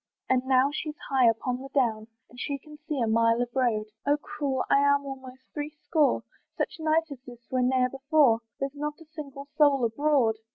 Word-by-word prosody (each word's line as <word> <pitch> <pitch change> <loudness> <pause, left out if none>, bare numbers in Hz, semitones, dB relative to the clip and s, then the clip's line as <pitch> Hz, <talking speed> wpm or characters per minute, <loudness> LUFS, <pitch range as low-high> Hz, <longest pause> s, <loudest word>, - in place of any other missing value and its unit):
And 260 -1 +3
now 265 +1 +4
she's 305 0 -4
high 260 -3 +5
upon 245 +3 -2
the 270 - -8
down, 220 -5 +1 0.2
And 245 - -15
she 280 +2 -2
can 300 +2 -15
see 300 -4 -2
a 235 - +2
mile 230 +1 +3
of 245 0 -1
road, 235 -5 +1 0.2
"Oh 290 +1 +2
cruel! 290 -3 -3
I'm 280 0 +3
almost 260 -1 -9
three 295 0 -3
score; 305 0 +1 0.3
"Such 360 - -2
night 320 0 +1
as 275 - -7
this 240 -1 -13
was 255 -1 +2
ne'er 255 -1 +3
before, 270 -3 +3 0.2
"There's 275 0 -2
not 295 +1 -4
a 325 - -14
single 295 -3 -9
soul 280 -4 +4
abroad." 245 -2 +2
270 Hz, 195 wpm, -27 LUFS, 250-295 Hz, 0.3 s, high